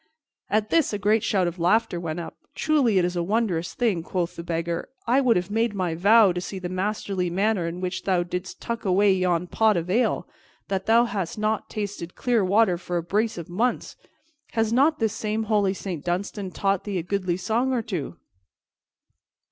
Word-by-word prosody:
At 215 0 0
this 325 -9 +3
a - - 0
great 210 +2 +2
shout 195 -5 +2
of 175 +1 -3
laughter 180 +1 +2
went 165 -1 -4
up. 170 - -7 0.2
"Truly, 280 -10 +2
it 180 - +4
is 180 0 -2
a 175 - 0
wondrous 185 -3 -1
thing," 220 -9 +1
quoth 175 +1 -3
the - - -6
Beggar, 170 0 -3 0.2
"I 255 +4 +3
would 245 -4 +4
have 180 +2 -1
made 225 0 +1
my 180 -4 -1
vow, 200 +4 +5
to 175 0 -3
see 190 - -6
the 180 -1 -5
masterly 190 -1 -2
manner 195 0 +1
in 175 +2 -5
which 185 0 -3
thou 185 -3 +2
didst 180 +1 -5
tuck 235 -1 -4
away 195 0 +4
yon 180 -2 +1
pot 215 +2 +2
of 170 +2 -2
ale, 240 +5 +1 0.4
that 195 -1 -2
thou 230 +2 +5
hadst 195 -7 -3
not 215 0 -1
tasted 200 -5 -5
clear 240 -4 +1
water 190 -2 +3
for 175 0 -3
a 170 - -2
brace 210 +5 0
of 170 - -6
months. 230 +8 -1 0.6
Has 225 0 +1
not 290 +5 +4
this 220 -4 0
same 220 0 -2
holy 205 -3 +1
Saint 180 -7 -5
Dunstan 190 +2 -3
taught 195 +1 0
thee 200 -2 -3
a 170 - -2
goodly 185 -1 -1
song 230 +7 0
or 245 -3 0
two?" 165 - -4
195 Hz, 200 wpm, -25 LUFS, 175-220 Hz, 0.6 s, vow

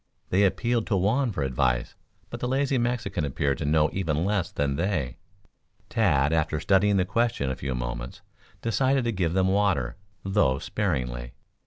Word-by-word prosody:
They 100 +2 +4
appealed 115 +5 0
to 110 - +1
Juan 115 +7 +1
for 75 -8 -2
advice, 65 -2 0 0.4
but - - -5
the 125 - -2
lazy 135 0 +1
Mexican 115 -7 -1
appeared 70 -1 -1
to 80 - -2
know 75 +1 +3
even 80 -3 0
less 100 -4 0
than 70 -1 -1
they. 80 -8 -1 0.7
Tad, 80 - +2
after 80 -1 +1
studying 100 +4 +3
the 90 - +2
question 115 - 0
a - - -3
few 65 0 -4
moments, - - -5 0.4
decided 130 +3 +2
to 120 - 0
give 90 -5 -1
them 95 0 +2
water, 95 -12 +1 0.3
though 95 -10 +2
sparingly. 60 - -2
90 Hz, 165 wpm, -26 LUFS, 70-105 Hz, 0.7 s, They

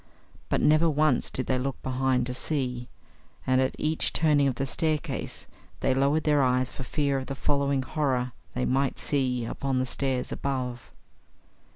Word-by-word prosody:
But - - +1
never 155 +2 +5
once 150 -3 +2
did 130 - -2
they 130 - +1
look 135 +1 -3
behind 130 -1 +1
to 125 - -3
see; 125 -3 -2 0.6
and 130 0 +3
at 130 - 0
each 155 +1 +1
turning 150 -3 +3
of 130 - 0
the 135 - -1
staircase 155 +2 -2 0.4
they - - +2
lowered 140 +4 +2
their 150 -2 +3
eyes 130 -1 +2
for - - -7
fear 140 +1 0
of 130 - -7
the 135 - -4
following 140 -1 +1
horror 130 -3 -1 0.2
they 125 - 0
might 135 +1 +1
see 130 -4 0
upon 135 +3 -2
the 130 - +1
stairs 130 -1 -1
above. 125 -3 -3
135 Hz, 170 wpm, -27 LUFS, 130-145 Hz, 0.6 s, never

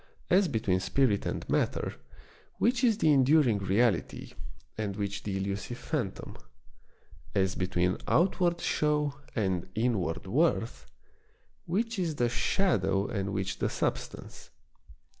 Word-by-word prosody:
As 190 +2 +5
between 105 - 0
spirit 105 +2 +1
and - - -4
matter, - - 0 0.6
which 245 +2 +1
is 230 -4 +4
the 155 -9 +4
enduring 135 -5 +4
reality, 100 +1 0 0.4
and 105 -3 -3
which 100 -1 -3
the 100 -2 -3
elusive 100 +5 -3
phantom 125 -11 -4 0.5
} 65 - -26
As 95 -1 +2
between 90 0 0
outward 175 0 +2
show 150 -1 +1 0.2
and 95 -6 -1
inward 105 -9 0
worth, 115 - 0 0.8
which 220 +4 -1
is 165 -4 -1
the 120 -4 +1
shadow 100 - +1
and 100 -2 -2
which 95 -1 -3
the - - 0
substance - - -4
110 Hz, 120 wpm, -29 LUFS, 95-155 Hz, 0.8 s, As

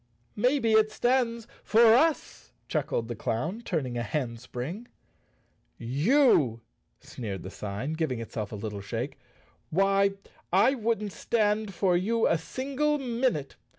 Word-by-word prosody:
"Maybe 245 +1 +2
it 220 0 +4
stands 235 -2 0 0.2
for 225 0 +6
us?" 310 +5 +1
chuckled 115 - -1
the 120 - -3
clown, 130 - -2
turn¬ 165 - -2
ing 120 -1 -4
a - - -1
handspring. 125 - -4 0.9
"You!" 140 - +3 0.4
sneered 100 -7 -6
the 95 - -7
sign, 105 +10 -4
giving 155 -7 -2
itself 110 -2 -5
a - - -5
little 105 -1 -5
shake. 115 +7 -5 0.5
"Why, 195 +2 +3 0.4
I 205 +9 +5
wouldn't 225 -4 -1
stand 210 -3 0
for 180 0 +2
you 225 +6 +1
a 165 - +2
single 275 - -1
minute. 240 - -1
195 Hz, 130 wpm, -28 LUFS, -, 0.9 s, for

